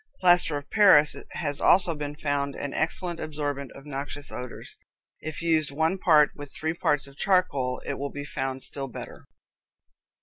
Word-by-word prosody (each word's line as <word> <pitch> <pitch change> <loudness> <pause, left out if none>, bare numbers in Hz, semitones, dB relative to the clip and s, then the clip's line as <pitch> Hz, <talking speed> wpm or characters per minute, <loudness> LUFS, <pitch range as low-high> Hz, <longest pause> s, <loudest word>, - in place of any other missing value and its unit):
Plaster 175 -4 +5
of 145 0 -9
Paris 195 -9 +6 0.2
has 145 -3 -2
also 180 -2 +4
been 145 -1 -5
found 145 -2 -2
an 145 - -5
excellent 170 +1 -2
absorbent 145 -3 -4
of 140 - -13
noxious 145 0 -6
odors. 125 -1 -8 0.4
If 155 +2 -6
used 160 -3 +3
one 160 +6 0
part 150 -5 +5
with 145 -1 -10
three 160 +1 -3
parts 150 -3 0
of 140 0 -15
charcoal, 145 -10 +1
it - - -4
will 140 +1 -3
be 145 +1 -7
found 135 -2 -4
still 135 -1 -4
better. 125 - -9
145 Hz, 165 wpm, -26 LUFS, 140-160 Hz, 0.4 s, Paris